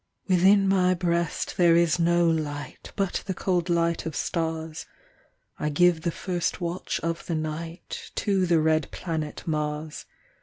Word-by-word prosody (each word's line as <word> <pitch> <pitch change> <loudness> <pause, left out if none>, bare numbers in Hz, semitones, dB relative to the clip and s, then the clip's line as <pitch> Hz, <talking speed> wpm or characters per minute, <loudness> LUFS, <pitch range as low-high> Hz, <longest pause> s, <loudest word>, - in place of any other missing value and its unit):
Within 195 +2 +5
my 185 -1 +3
breast 170 -2 -1
there 170 -2 +5
is 170 -1 +3
no 170 0 +3
light, 145 -4 -3
But 195 -3 -1
the 190 - -2
cold 180 -1 0
light 170 -1 +1
of 160 - -5
stars; 160 0 -3 0.7
I 150 - 0
give 170 +2 +3
the 170 - 0
first 175 +1 -2
watch 175 +1 -3
of 165 +1 -3
the 170 - -1
night 160 +2 -5
To 195 -3 +1
the 170 -1 +4
red 155 -1 +2
planet 160 -4 -4
Mars. 150 0 -3
170 Hz, 150 wpm, -26 LUFS, 160-180 Hz, 0.7 s, Within